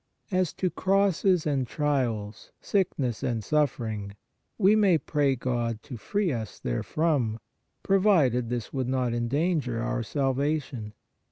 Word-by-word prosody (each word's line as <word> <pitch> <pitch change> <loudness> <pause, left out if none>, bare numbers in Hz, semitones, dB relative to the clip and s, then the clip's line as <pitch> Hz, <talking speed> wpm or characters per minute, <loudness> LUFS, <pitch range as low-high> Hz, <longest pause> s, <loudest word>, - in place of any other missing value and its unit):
As 185 -2 +1
to 185 -2 -1
crosses 190 -2 +2
and 135 -4 0
trials, 120 -8 -2
sickness 140 - -1
and 115 -3 -1
suffering, 110 -9 -1 0.4
we 210 0 +5
may 200 -6 +4
pray 145 -2 +1
God 120 -3 -2
to 125 - -8
free 200 - -1
us 110 -5 -5
therefrom, 120 - 0 0.5
provided 165 - +3
this 120 -2 -4
would 130 -3 -1
not 130 -2 0
endanger 130 +1 0
our 115 - -1
salvation. 135 -3 -1
135 Hz, 120 wpm, -27 LUFS, 115-165 Hz, 0.5 s, we